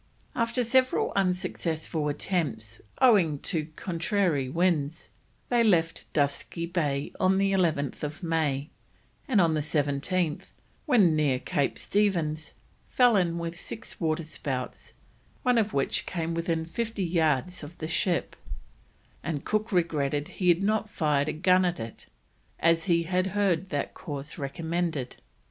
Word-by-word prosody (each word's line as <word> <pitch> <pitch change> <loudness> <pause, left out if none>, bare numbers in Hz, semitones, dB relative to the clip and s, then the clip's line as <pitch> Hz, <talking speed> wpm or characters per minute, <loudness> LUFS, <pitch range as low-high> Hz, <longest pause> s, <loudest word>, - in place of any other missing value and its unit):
After 235 +1 0
several 255 +2 +2
unsuccessful 165 -5 -1
attempts, 145 - -2 0.2
owing 195 - +5
to 160 -5 -1
contrary 175 - 0
winds, 165 -1 0 0.4
they 240 -1 +4
left 165 -6 +1
Dusky 145 +3 -1
Bay 150 -5 -1
on 190 0 +3
11th 170 -5 0
May, 155 -3 0 0.6
and 230 -7 +3
on 165 -3 +4
the 155 - +1
17th, 150 +3 0 0.4
when 200 - +5
near 145 -4 +2
Cape 135 +2 -1
Stephens, 170 -7 0 0.4
fell 245 -3 +5
in 170 -3 +2
with 170 0 -4
six 225 - -8
water 160 0 0
spouts, 135 -5 -5 0.5
one 250 -3 +4
of 215 -1 0
which 135 -6 0
came 165 -2 -2
within 165 -1 -1
fifty 220 +3 -3
yards 165 0 +1
of 150 +3 -10
the 155 - -4
ship, 170 +1 0 0.9
and 145 -2 -3
Cook 215 +1 0
regretted 150 -5 0
he 180 -2 0
had 175 +2 +4
not 215 +1 +1
fired 150 -5 +1
a - - +1
gun 185 +3 +4
at 175 -1 0
it, 115 0 -8 0.5
as 165 0 +3
he 170 -3 +3
had 185 +2 0
heard 190 -2 +1
that 145 -4 -2
course 145 -2 -7
recommended. 160 -1 -2
165 Hz, 135 wpm, -28 LUFS, 150-185 Hz, 0.9 s, owing